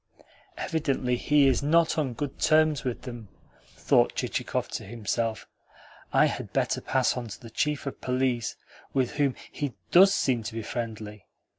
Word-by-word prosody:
"Evidently 135 -5 0
he 145 +3 +3
is 135 -2 +3
not 160 +3 +3
on 145 -6 -1
good 140 +2 -5
terms 155 -2 +3
with 125 -3 -3
them," 120 -4 -8 0.5
thought - - +3
Chichikov - - -2
to - - -5
himself. 110 +1 -3 0.6
"I - - +5
had - - -3
better - - 0
pass 130 -2 +1
to 120 -4 -6
the 115 -3 -12
Chief 150 +4 -1
of 140 - -6
Police, 125 -2 0 0.4
which 130 -3 +1
whom 140 -3 +1 0.2
he 145 -4 -3 0.2
DOES 195 +2 +8
seem 125 -4 +1
to 110 +1 -6
be 115 - -3
friendly." 110 -4 -6
130 Hz, 155 wpm, -27 LUFS, 115-145 Hz, 0.6 s, DOES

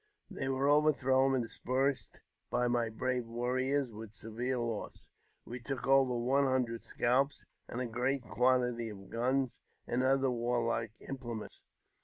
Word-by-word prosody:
They 135 -9 -2
were 135 +1 +1
over 150 +1 +5
.^ - - -17
thrown 130 0 +3
and 125 - +1
dispersed 130 +4 -1 0.3
by 125 0 +1
my 120 -1 +1
brave 125 +1 -2
warriors, 130 +3 0
with 110 0 -9
severe 120 +4 -3
los^il 115 -3 -4 0.4
We 125 +2 -6
took 130 +2 -4
over 135 -2 +4
one 135 +4 +2
hundred 125 -3 0
scalps, 130 +4 +1 0.2
and 120 - -5
a 125 - -1
great 125 +3 -1
quantity 125 -2 +1
of' 100 -2 -11
guns 130 +2 0 0.3
and 120 +1 0
other 135 0 +3
warlike 115 -2 0
implements. 120 -5 -6
125 Hz, 150 wpm, -33 LUFS, 120-135 Hz, 0.4 s, over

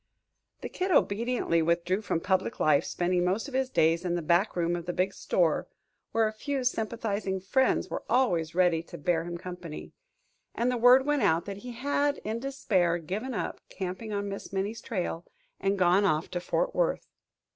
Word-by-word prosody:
The - - -5
Kid 370 +1 -2
obediently 235 - +2
withdrew 170 +4 +1
from 180 -5 -1
public 190 +3 0
life, 155 -2 +4
spending 175 0 0
most 190 +8 0
of 280 - -10
his 265 0 0
days 165 -3 +2
in 175 -1 -1
the 175 - -2
back 175 +6 +2
room 175 0 +1
of 175 0 -6
the 175 - -1
big 190 +2 0
store, 170 -4 +1 0.4
where 225 -1 +3
a 215 - -4
few 270 +4 -3
sympathizing 220 -5 -1
friends 260 +8 +1
were - - -4
always 175 -11 +1
ready 175 -3 +3
to 165 - -11
bear 165 +2 0
him 175 0 -5
company; 175 -3 -8 0.6
and 240 +2 +1
the - - 0
word 250 +3 +6
went 295 -2 +1
out 165 -5 +2
that 195 -1 -6
he 245 +4 -8
had, 285 +3 0
in 220 +2 -2
despair, 200 -10 +1
given 205 +10 -4
up - - -4
camping 190 +4 -5
on 205 0 -2
Miss 200 0 -6
Minnie's 195 +4 -2
trail 180 -6 -3 0.4
and 195 +1 0
gone 185 +2 +4
off 155 -4 +1
to 175 - -2
Fort - - -1
Worth. - - 0
195 Hz, 190 wpm, -28 LUFS, 175-235 Hz, 0.6 s, word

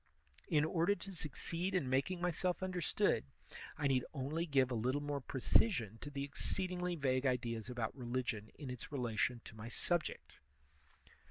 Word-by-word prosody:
In 150 -2 +4
order 170 +4 +3
to 195 -1 -8
succeed 170 +3 -2
in 165 -8 +2
making 135 +8 +1
myself 180 +1 0
understood, 180 - +1 0.5
I - - -1
need 130 -2 +3
only 150 +6 -1
give 135 -4 +3
a - - +1
little 125 +5 +1
more 145 -1 -2
precision 125 - +3
to 145 - -5
the 140 -1 -3
exceedingly 180 +4 -1
vague 135 -3 +2
ideas 120 -3 -1
about 120 -3 -2
religion 120 -4 -2
in 140 -4 -6
its 125 +1 -7
relation 120 -2 0
to - - -10
my 110 +1 -7
subject. 170 +7 -1
140 Hz, 155 wpm, -37 LUFS, 125-170 Hz, 0.5 s, In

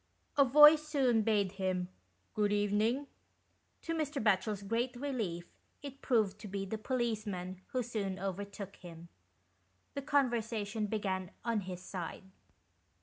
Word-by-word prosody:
A 280 - +7
voice 300 +3 +8
soon 260 -7 +3
bade 205 -3 +2
him 185 -2 -1 0.2
" 95 +2 -42
Good 210 -1 +1
evening." 210 +6 +1 0.8
To 330 - -2
Mr. 305 -3 -1
Batchel's 210 -1 +1
great 235 +5 -1
relief 225 -11 -3 0.3
it 275 -1 -8
proved 215 -5 +1
to 210 - -8
be 195 0 -3
the 215 +3 -4
policeman, 210 -7 -2
who 255 -1 -1
soon 205 -5 -3
overtook 195 +1 -5
him. 170 -1 -11 0.8
The 280 - -3
con 280 -3 +2
versation 220 -2 -2
began 190 -4 -2 0.2
on 230 -3 +1
his 180 0 -6
side. 180 -2 -6
210 Hz, 140 wpm, -33 LUFS, 190-245 Hz, 0.8 s, voice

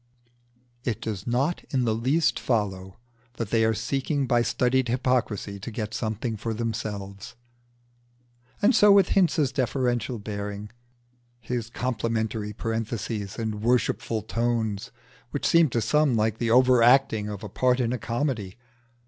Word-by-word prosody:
It 120 -5 -2
does 105 -2 -5
not 135 +8 0
in 130 -3 0
the 110 - +2
least 135 +9 +1
follow 95 -5 -2 0.4
that 115 -3 -4
they 115 -1 +3
are 110 0 +2
seeking 135 +5 -1
by 120 -1 +3
studied 125 +2 +1
hypocrisy 120 -5 -1
to 100 - -6
get 110 -1 -5
something 110 0 -3
for 110 +1 -3
themselves. 105 -4 -5 1.3
And 230 +6 +5
so 210 -2 +7
with 200 -1 +5
Hinze's 160 -7 +2
deferential 125 -2 -1
bearing, 105 0 -6 1.0
complimentary 110 -3 -2
parentheses, 110 -2 -4
and 110 -2 -3
worshipful 115 -2 0
tones, 115 -1 -1 0.4
which 145 - -3
seem 165 -3 +5
to 120 -1 0
some 145 +3 +2
like 110 0 0
the 115 - 0
over 125 +1 +5
acting 115 -4 +4
of 105 -1 -7
a - - -4
part 125 +5 +1
in 120 -1 0
a 125 - -3
comedy. 115 -5 -2
115 Hz, 140 wpm, -26 LUFS, 105-125 Hz, 1.3 s, so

